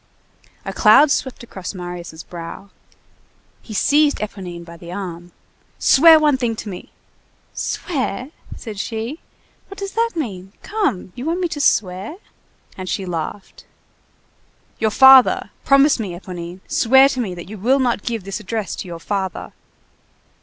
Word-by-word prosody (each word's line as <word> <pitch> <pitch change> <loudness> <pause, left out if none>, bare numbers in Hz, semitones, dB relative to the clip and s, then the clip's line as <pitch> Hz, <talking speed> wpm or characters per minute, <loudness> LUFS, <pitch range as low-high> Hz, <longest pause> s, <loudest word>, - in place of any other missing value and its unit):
A - - -4
cloud 300 -1 +6
swept 260 -3 -2
across 195 -4 -7
Marius' 175 -2 -7
brow. 175 +3 -9 0.9
He 215 - -9
seized 290 +6 +3
Éponine 180 -5 -6
by 170 0 -11
the 170 0 -11
arm:— 175 -2 -7 0.5
"Swear 320 +3 +7
one 300 -3 +3
thing 240 -3 -1
to 215 - -7
me!" 180 - -9 0.6
"Swear!" 260 - -3 0.3
said 215 -4 -8
she, 230 +9 -4 0.5
"what 395 - -11
does 395 0 -5
that 460 0 0
mean? 195 - -5
Come! 400 - -2
You 250 - -7
want 335 +3 -1
me 355 - +1
to 295 -2 -4
swear?" 190 - +1 0.6
And 185 -1 -6
she 195 - -2
laughed. 175 +3 -6 1.1
"Your 220 - +2
father! 265 +3 +6
promise 275 0 +4
me, 200 -5 -4
Éponine! 175 0 -8
Swear 265 +3 +5
to 265 - -3
me 190 -6 -4
that 175 0 -9
you 210 +1 -9
will 255 +7 +3
not 245 -5 0
give 230 -3 -3
this 195 +3 -5
address 215 0 -4
to - - -6
your 170 -1 -6
father!" 190 +1 -4
215 Hz, 150 wpm, -20 LUFS, 180-270 Hz, 1.1 s, Swear